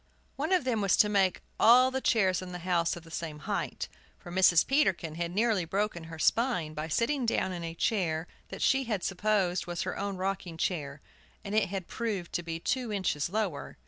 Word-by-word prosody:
One - - -2
of 370 -5 +3
them 240 -4 0
was 195 -2 +3
to 210 - +5
make 195 -3 +2 0.2
all 255 +3 +7
the 265 0 -2
chairs 190 -8 +2
in 180 -1 -8
the - - -4
house 170 -2 +1
of 175 - -10
the 165 - -15
same 160 -2 -5
height, 150 - -3 0.3
for 175 - -11
Mrs. 180 -2 +5
Peterkin 195 - +1
had 170 +1 -3
nearly 215 -1 +2
broken 190 -1 -2
her 160 0 -9
spine 180 -4 +1
by 155 +1 -4
sitting 245 - 0
down 230 -4 0
in 175 -2 -5
a 165 0 -5
chair 165 -6 0 0.2
that - - -5
she 270 0 +3
had 210 -6 -2
supposed 190 -3 0
was 175 -1 -2
her 185 - -3
own 200 -1 -3
rocking 185 -3 -3
chair, 145 -5 -2 0.4
and 200 -1 -5
it 215 -3 +2
had 190 -2 -4
proved 205 -7 -3
to 175 - 0
be 165 -1 -5
two 250 +5 -1
inches 185 -7 -1
lower. 200 -7 -3
185 Hz, 210 wpm, -29 LUFS, 170-215 Hz, 0.4 s, all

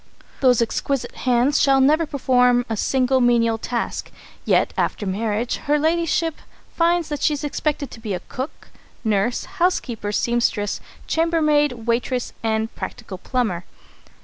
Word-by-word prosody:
Those 250 -3 +4
exquisite 270 +3 -2
hands 255 +3 +2
shall 275 -1 +4
never 305 +4 +4
perform 250 -3 +3
a 225 - -2
single 260 +3 +2
menial 230 -2 +3
task! 235 +1 -3 0.4
Yet, - - +2
after 205 - -1
marriage, 215 +4 -1
Her 295 +1 +1
Ladyship 325 +1 +1 0.4
finds 340 -1 +2
that 295 -2 -4
she 300 - +3
is 290 - -7
expected 295 -2 -2
to - - -10
be 215 -4 -3
a - - -4
cook, 260 +4 -6 0.3
nurse, 220 +2 0
housekeeper, 340 - -1
seamstress, 230 -2 0 0.2
chambermaid, 300 -7 +1
waitress, 245 +1 -1
and 220 0 -1
practical 190 -2 -7
plumber. 215 -7 -1
250 Hz, 135 wpm, -22 LUFS, 230-295 Hz, 0.4 s, Those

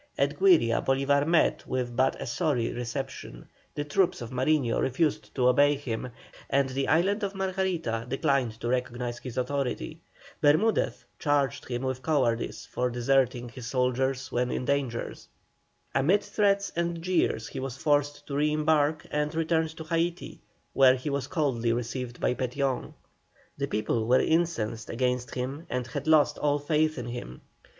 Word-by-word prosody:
At - - 0
Güiria 380 -3 +4
Bolívar 140 +2 +2
met 170 -1 +2
with 125 -2 -2
but 130 +2 +2
a - - -4
sorry 120 -1 0
reception, 125 - -6 0.3
the 145 - -1
troops 170 +5 +1
of 120 -1 -7
Mariño 130 -1 +1
refused 145 +4 -1
to 125 -2 +3
obey 145 +3 +5
him, 125 -3 -4 0.4
and 140 -1 +2
the 135 +1 -1
island 195 +7 +2
of 200 -1 -3
Margarita 185 -12 -1
declined 135 -5 0
to - - -2
recognise 120 -1 -2
his 125 -1 -8
authority. 140 +4 -2 0.4
Bermudez 160 +10 +2
charged 145 -4 0
him 120 0 -3
with 130 -1 -2
cowardice 125 -5 0
for 125 0 -1
deserting 125 0 +1
his 120 -1 -8
soldiers 130 +1 0
when 125 +1 0
in 125 - -2
danger. 135 -4 -1 0.8
Amid 185 +10 +3
threats 200 -1 +1
and 170 0 -1
jeers 180 -1 0
he 135 - -6
was 135 -1 -5
forced 145 0 +1
to 140 - -5
re 150 +1 +2
embark 155 0 +2
and 150 +1 -1
returned 160 0 0
to 160 - -6
Haití, 170 +2 -2 0.3
where 130 -1 +6
he 130 +3 -4
was 140 -2 -2
coldly 130 -9 0
received 120 +1 -4
by - - +1
Petión. 130 +1 -2 0.6
The - - -2
people 110 +1 -1
were 125 +2 +5
incensed 120 -10 0
against 125 0 -1
him 135 +6 -4
and 125 0 -2
had 140 +4 -5
lost 150 -2 +4
all 145 -1 +2
faith 155 +1 +1
in 125 - -4
him. 120 - -7
135 Hz, 160 wpm, -28 LUFS, 125-155 Hz, 0.8 s, where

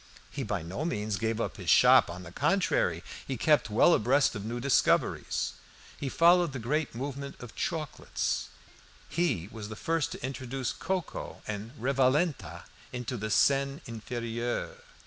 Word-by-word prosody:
He 140 - -4
by 105 -8 -2
no 90 - -4
means 105 -10 -1
gave 115 +2 -1
up - - -3
his - - -4
shop. - - +7
On 90 +2 -7
the 85 - -10
contrary, 90 - +1 0.2
he 130 - -2
kept 150 -2 +3
well 115 +11 +5
abreast 135 +4 +3
of 105 - -5
new 115 +3 -4
discoveries. 135 +1 +1 0.4
He 140 - -4
followed 170 0 +4
the - - -3
great 140 +3 -1
movement 140 +2 -5
of 120 -2 -10
chocolates; 155 -5 -2 0.6
he 140 - 0
was 110 -2 -7
the 110 - -6
first 165 +5 -1
to - - -6
introduce 130 -1 -3
"cocoa" 185 -2 -4
and 110 +6 -6
"revalenta" 135 +5 +1 0.3
into 125 0 -4
the 110 -1 -3
Seine 140 +5 +3
Inferieure. 120 - -4
125 Hz, 150 wpm, -29 LUFS, 110-145 Hz, 0.6 s, shop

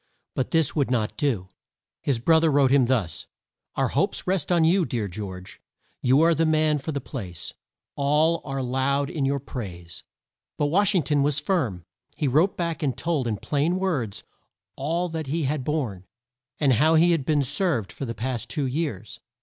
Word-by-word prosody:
But 130 - -1
this 160 -4 +2
he - - -3
would 140 - +1
not 115 -4 0
do. 110 -11 -1 0.5
His 135 -4 0
brother 160 +6 +4
wrote 140 -2 +4
him 135 -3 +4
thus: 110 -11 -1 0.5
"Our - - +1
hopes - - 0
rest 185 -3 0
on 170 -2 +4
you, 180 +3 +4
dear 115 -9 -2
George. 95 -1 -8 0.4
You 130 +4 +4
are 165 +1 +5
the 165 +1 +1
man 155 -1 +2
for 160 - -4
the 140 - -2
place: 90 - -7 0.4
all 150 +4 +2
are 135 -2 -3
loud 135 +2 0
in 145 -4 -1
your 140 +1 +1
praise." 90 -11 -7 0.6
But 145 - +1
Wash 200 +2 +3
ing 175 - +3
ton 145 -1 +1
was 145 0 +1
firm. 125 - -1 0.3
He 150 - 0
wrote 155 +9 +2
back 170 -2 -2
and 140 -5 -1
told 160 -7 -1
in 110 -2 -1
plain 150 - 0
words 145 - -2 0.5
all 165 +6 -1
that 160 -3 -4
he 160 +4 -1
had 140 0 -1
borne, 120 - -3 0.5
and 140 -4 +4
how 155 +7 +4
he 170 +2 +5
had 165 -5 +1
been 145 +1 +2
served 140 - 0
for 135 - -6
the 115 -2 -5
past 120 +2 -3
two 145 - -1
years. 135 - -3
140 Hz, 190 wpm, -25 LUFS, 125-160 Hz, 0.6 s, are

